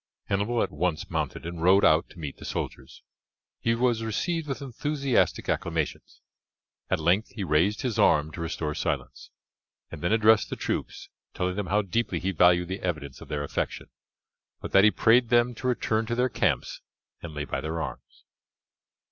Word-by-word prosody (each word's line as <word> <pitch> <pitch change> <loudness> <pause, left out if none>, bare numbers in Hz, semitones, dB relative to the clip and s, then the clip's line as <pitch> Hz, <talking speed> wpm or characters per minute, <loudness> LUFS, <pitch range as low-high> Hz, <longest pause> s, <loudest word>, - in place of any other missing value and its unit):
Hannibal 105 +4 +1
at - - -3
once 80 +1 -2
mounted - - -3
and 85 -1 -6
rode 95 +3 +5
out 80 +1 +4
to - - -17
meet 75 -4 -6
the - - -12
soldiers. 65 - -6 0.6
He 115 0 +1
was 120 -1 +1
received 160 - -2
with 135 - -3
enthusiastic 140 0 0
acclamations; - - -3 0.7
at - - +2
length 90 +7 +2
he 105 - -3
raised 90 +6 +1
his 125 -4 -1
arm 75 +1 +4
to 85 - -7
restore 80 -2 -3
silence, - - -3 0.6
and - - -8
then 85 - 0
addressed 110 -1 +4
the - - -3
troops, - - -4 0.3
telling 90 0 -1
them 100 -2 -3
how 105 +4 +2
deeply 100 -1 -1
he 95 +4 -1
valued 90 0 +4
the 95 +2 -4
evidence 75 -7 -4
of - - -10
their 75 0 -3
affection, 70 - -4 0.7
but - - -7
that 95 - +6
he 105 - +8
prayed 115 +2 +4
them 120 0 +3
to 125 +2 -5
return 110 -3 0
to 120 - -1
their 125 +1 +2
camps - - -1 0.4
and 80 -3 -8
lay 75 0 -3
by 65 - -3
their 80 +2 -3
arms. - - -7
95 Hz, 180 wpm, -27 LUFS, 80-115 Hz, 0.7 s, he